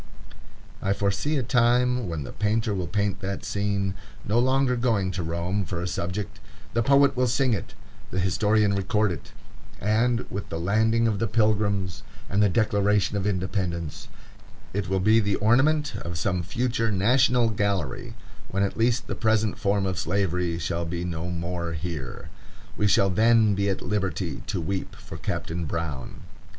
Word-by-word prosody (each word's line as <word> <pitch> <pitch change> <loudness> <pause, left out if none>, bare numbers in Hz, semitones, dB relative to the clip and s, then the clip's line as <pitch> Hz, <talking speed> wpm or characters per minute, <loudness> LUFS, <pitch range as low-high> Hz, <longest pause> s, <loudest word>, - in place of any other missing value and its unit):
I 100 - +1
foresee 100 +10 0
the 130 - 0
time 125 -1 +2
when 80 -3 -3
the - - -7
painter 110 +1 0
will 90 -3 -2
paint 100 0 -1
that 100 0 -4
scene, 100 -1 -1 0.3
no 110 +4 +2
longer 130 0 +2
going 115 -6 +1
to 90 0 -3
Rome 85 +4 -1
for 90 -2 -4
a 90 - -2
subject; 100 +5 -4 0.3
the 115 - +2
poet 140 +3 +4
will 125 0 +2
sing 125 +1 +2
it; 100 - -4 0.3
the 95 - -2
historian 105 +3 +2
record 100 +1 +1
it; 85 - -7 0.5
and, 115 +4 +1
with 100 - -5
the 80 - -3
Landing 110 +6 +2
of 105 -3 0
the 115 - +1
Pilgrims 100 -6 +1 0.3
and 100 +2 +2
the 105 - +5
Declaration 105 -1 +2
of 100 0 -1
Independence, 90 -5 -2 0.7
it 95 -2 -2
will 95 0 +1
be 110 +4 +5
the 100 -2 +1
ornament 145 +8 +3
of 85 -3 -5
some 90 +2 0
future 115 +2 -1
national 120 +4 +3
gallery, 100 - -2 0.3
when 100 0 0
at 100 - -2
least 120 +2 +2
the - - -4
present 110 -2 +1
form 100 -2 +1
of 95 -1 -2
Slavery 90 -2 0
shall 85 +1 -2
be 85 +1 -3
no 85 0 -3
more 85 0 -3
here. 80 -5 -5 0.5
We 105 - +2
shall 95 -1 +3
then 110 +1 +4
be 100 +1 0
at 95 - -2
liberty 95 -3 -2
to - - -2
weep 95 +3 -3
for - - -10
Captain 85 +1 -3
Brown. 75 -4 -4
100 Hz, 165 wpm, -26 LUFS, 90-110 Hz, 0.7 s, the